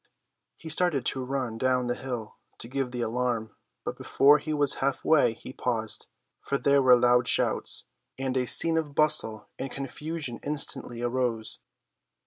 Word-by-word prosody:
He 165 Hz, -, -11 dB
started 160 Hz, -5 st, +1 dB
to 130 Hz, -, 0 dB
run 125 Hz, -4 st, -3 dB
down 130 Hz, 0 st, +1 dB
the 120 Hz, -, 0 dB
hill 120 Hz, -4 st, -6 dB, 0.2 s
to -, -, -4 dB
give 135 Hz, +1 st, -2 dB
the 125 Hz, -1 st, -4 dB
alarm, 115 Hz, -2 st, -2 dB, 0.3 s
but -, -, -3 dB
before 145 Hz, +2 st, +4 dB
he 155 Hz, +2 st, -5 dB
was 145 Hz, -2 st, +3 dB
half 135 Hz, 0 st, -1 dB
way 145 Hz, -7 st, +4 dB
he 130 Hz, -, -10 dB
paused, 115 Hz, -4 st, -1 dB, 0.3 s
for 140 Hz, -, -1 dB
there 140 Hz, 0 st, +3 dB
were 130 Hz, -1 st, +7 dB
loud 125 Hz, 0 st, +3 dB
shouts, -, -, +1 dB, 0.3 s
and 130 Hz, -1 st, -2 dB
a 125 Hz, -1 st, 0 dB
scene 165 Hz, +5 st, +3 dB
of 145 Hz, -3 st, -6 dB
bustle 150 Hz, -9 st, +3 dB
and 135 Hz, -, -3 dB
confusion 140 Hz, -1 st, -5 dB
instantly 140 Hz, -5 st, -2 dB
arose. 120 Hz, -2 st, -1 dB
130 Hz, 160 wpm, -27 LUFS, 120-140 Hz, 0.3 s, were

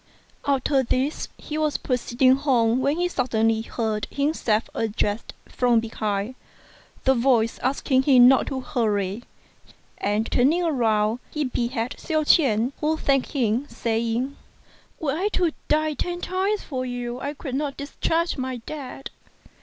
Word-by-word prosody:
After 275 Hz, 0 st, +2 dB
this, 260 Hz, +4 st, -1 dB
he 305 Hz, 0 st, -5 dB
was 305 Hz, -1 st, +1 dB
proceeding 255 Hz, 0 st, +2 dB
home 250 Hz, -4 st, +2 dB
when 280 Hz, +4 st, +1 dB
he 355 Hz, 0 st, +1 dB
suddenly 225 Hz, -7 st, +1 dB
heard 220 Hz, -2 st, -2 dB
himself 280 Hz, -7 st, 0 dB
addressed 215 Hz, -1 st, -2 dB
from 245 Hz, -2 st, +2 dB
behind, 215 Hz, 0 st, -2 dB, 0.7 s
the 265 Hz, -, +4 dB
voice 235 Hz, -3 st, +2 dB
asking 260 Hz, 0 st, +1 dB
him 255 Hz, -3 st, +7 dB
not 265 Hz, 0 st, +4 dB
to 265 Hz, -2 st, -3 dB
hurry; 210 Hz, -6 st, -1 dB, 0.8 s
and 210 Hz, +2 st, 0 dB
turning 305 Hz, +8 st, +3 dB
round 225 Hz, -7 st, +1 dB
he 300 Hz, -, -2 dB
beheld 240 Hz, -2 st, -2 dB
Hsiao 310 Hz, -2 st, 0 dB
ch'ien, 255 Hz, -6 st, +3 dB
who 310 Hz, +1 st, +1 dB
thanked 275 Hz, -4 st, +1 dB
him, 250 Hz, 0 st, 0 dB
saying, 230 Hz, +3 st, -1 dB, 0.6 s
"Were 285 Hz, -4 st, -1 dB
I 370 Hz, +5 st, 0 dB
to 350 Hz, -3 st, +2 dB, 0.2 s
die 310 Hz, 0 st, +2 dB
ten 350 Hz, +4 st, -3 dB
times 385 Hz, +4 st, -1 dB
for 260 Hz, -3 st, -4 dB
you 245 Hz, -1 st, -4 dB
I 285 Hz, +2 st, -4 dB
could 275 Hz, -3 st, -6 dB
not 280 Hz, 0 st, -2 dB
discharge 325 Hz, +4 st, -1 dB
my 260 Hz, -1 st, -3 dB
debt. 270 Hz, +2 st, -8 dB
255 Hz, 140 wpm, -24 LUFS, 230-290 Hz, 0.8 s, him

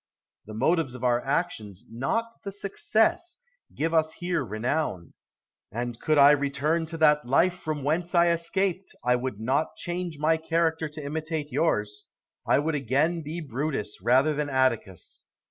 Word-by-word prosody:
The 110 Hz, -, -8 dB
motives 135 Hz, +2 st, +1 dB
of 125 Hz, -, -9 dB
our 120 Hz, -1 st, +2 dB
actions, 115 Hz, -, -2 dB
not 225 Hz, -, -2 dB
the 200 Hz, -, -5 dB
success, 220 Hz, -, 0 dB, 0.4 s
give 165 Hz, +2 st, -1 dB
us 160 Hz, -1 st, +2 dB
here 175 Hz, -4 st, -2 dB
renown. 110 Hz, -, -2 dB, 0.6 s
And 120 Hz, +2 st, -4 dB
could 155 Hz, -1 st, +1 dB
I 140 Hz, 0 st, +8 dB
return 150 Hz, +3 st, +1 dB
to 165 Hz, +1 st, -6 dB
that 150 Hz, -4 st, +4 dB
life 170 Hz, +8 st, +3 dB
from 155 Hz, -3 st, -4 dB
whence 170 Hz, +5 st, 0 dB
I 170 Hz, 0 st, +6 dB
am 170 Hz, -, +4 dB
escaped, 185 Hz, +2 st, -1 dB
I 125 Hz, 0 st, +3 dB
would 125 Hz, -4 st, -3 dB
not 135 Hz, +7 st, 0 dB
change 175 Hz, -2 st, -4 dB
my 155 Hz, +2 st, +2 dB
character 160 Hz, 0 st, 0 dB
to 150 Hz, -1 st, -8 dB
imitate 155 Hz, 0 st, -3 dB
yours; 105 Hz, -10 st, -1 dB, 0.4 s
I -, -, +4 dB
would 155 Hz, +3 st, 0 dB
again 150 Hz, +5 st, +1 dB
be 160 Hz, +3 st, -5 dB
Brutus 135 Hz, -, -3 dB
rather 130 Hz, +8 st, +4 dB
than 150 Hz, 0 st, -2 dB
Atticus. 125 Hz, -9 st, -1 dB
150 Hz, 160 wpm, -27 LUFS, 125-165 Hz, 0.6 s, I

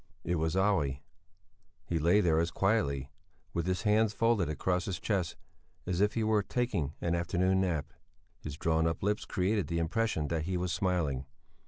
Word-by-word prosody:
It 85 Hz, +1 st, 0 dB
was 80 Hz, +2 st, 0 dB
Olle. 95 Hz, -9 st, +2 dB, 0.9 s
He 85 Hz, -, -1 dB
lay 85 Hz, +7 st, +4 dB
there 80 Hz, -4 st, +3 dB
as 85 Hz, +1 st, +1 dB
quietly, 70 Hz, -9 st, 0 dB, 0.4 s
with 85 Hz, 0 st, -1 dB
his 95 Hz, 0 st, -1 dB
hands 105 Hz, 0 st, +3 dB
folded 115 Hz, -8 st, +2 dB
across 90 Hz, +4 st, 0 dB
his 90 Hz, -4 st, -3 dB
chest, 95 Hz, -5 st, -1 dB, 0.5 s
as 90 Hz, +1 st, -1 dB
if 105 Hz, 0 st, +2 dB
he 115 Hz, -, +1 dB
were 110 Hz, -1 st, +3 dB
taking 100 Hz, -, -1 dB
an 85 Hz, -, 0 dB
afternoon 90 Hz, +2 st, +1 dB
nap. 80 Hz, -6 st, -1 dB, 0.5 s
His 75 Hz, -1 st, -7 dB
drawn 80 Hz, 0 st, +2 dB
up 80 Hz, +1 st, -2 dB
lips 105 Hz, +1 st, 0 dB
created 100 Hz, +2 st, 0 dB
the 85 Hz, -, -2 dB
impression 85 Hz, -2 st, 0 dB
that 80 Hz, -2 st, -1 dB
he 90 Hz, +1 st, -1 dB
was 90 Hz, -1 st, -1 dB
smiling. 85 Hz, -8 st, 0 dB
90 Hz, 175 wpm, -31 LUFS, 80-100 Hz, 0.9 s, lay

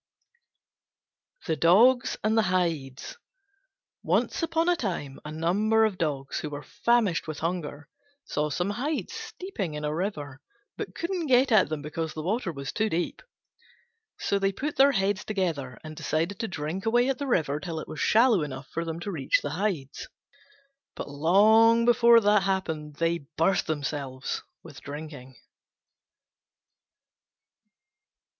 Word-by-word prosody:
THE 160 Hz, -, 0 dB
DOGS 230 Hz, +11 st, +4 dB
AND 215 Hz, +1 st, +2 dB
THE 225 Hz, -, +5 dB
HIDES 165 Hz, -, -2 dB, 0.8 s
Once -, -, 0 dB
upon 330 Hz, 0 st, 0 dB
a 355 Hz, -, +4 dB
time 170 Hz, -, -4 dB
a 150 Hz, -, -7 dB
number 205 Hz, +8 st, +2 dB
of 205 Hz, -4 st, -2 dB
Dogs, 140 Hz, -5 st, -2 dB
who 150 Hz, -, -4 dB
were 145 Hz, 0 st, -7 dB
famished 230 Hz, -10 st, +1 dB
with 155 Hz, -1 st, -5 dB
hunger, 155 Hz, -4 st, -3 dB, 0.4 s
saw 150 Hz, +1 st, -1 dB
some 175 Hz, +7 st, -1 dB
Hides 280 Hz, +8 st, -3 dB
steeping 215 Hz, -, -5 dB
in 150 Hz, 0 st, -4 dB
a 150 Hz, -, -1 dB
river, 150 Hz, -6 st, -4 dB, 0.3 s
but -, -, -6 dB
couldn't 340 Hz, -1 st, -2 dB
get 255 Hz, 0 st, +4 dB
at 205 Hz, -8 st, +5 dB
them 155 Hz, -2 st, -4 dB
because 160 Hz, +1 st, -4 dB
the 155 Hz, -, -4 dB
water 195 Hz, +1 st, -1 dB
was 140 Hz, -3 st, -6 dB
too 220 Hz, +1 st, 0 dB
deep. 175 Hz, -1 st, -2 dB, 1.0 s
So 200 Hz, -, 0 dB
they 195 Hz, 0 st, +1 dB
put 285 Hz, +9 st, -4 dB
their 275 Hz, +1 st, +6 dB
heads 195 Hz, -2 st, 0 dB
together, 165 Hz, -, -2 dB
and 155 Hz, 0 st, -8 dB
decided 160 Hz, +5 st, -2 dB
to 225 Hz, -, -2 dB
drink 180 Hz, +3 st, -4 dB
away 240 Hz, +2 st, +3 dB
at 270 Hz, 0 st, -1 dB
the 285 Hz, -, -3 dB
river 150 Hz, -, +1 dB
till 160 Hz, +1 st, -5 dB
it -, -, -7 dB
was 155 Hz, -, -7 dB
shallow 225 Hz, -4 st, +4 dB
enough 135 Hz, -2 st, -6 dB
for 165 Hz, -, -3 dB
them 165 Hz, 0 st, -5 dB
to 200 Hz, -, -4 dB
reach 145 Hz, -7 st, +1 dB
the 145 Hz, -, -3 dB
Hides. 170 Hz, -7 st, -3 dB, 0.9 s
But -, -, -6 dB
long 220 Hz, +9 st, +5 dB
before 235 Hz, -1 st, +6 dB
that 205 Hz, -1 st, +4 dB
happened 160 Hz, -6 st, -2 dB
they 165 Hz, -2 st, -1 dB
burst 185 Hz, +4 st, +2 dB
themselves 140 Hz, -3 st, -3 dB, 0.2 s
with 150 Hz, -5 st, -12 dB
drinking. 145 Hz, -3 st, -9 dB
175 Hz, 150 wpm, -27 LUFS, 150-220 Hz, 1.0 s, their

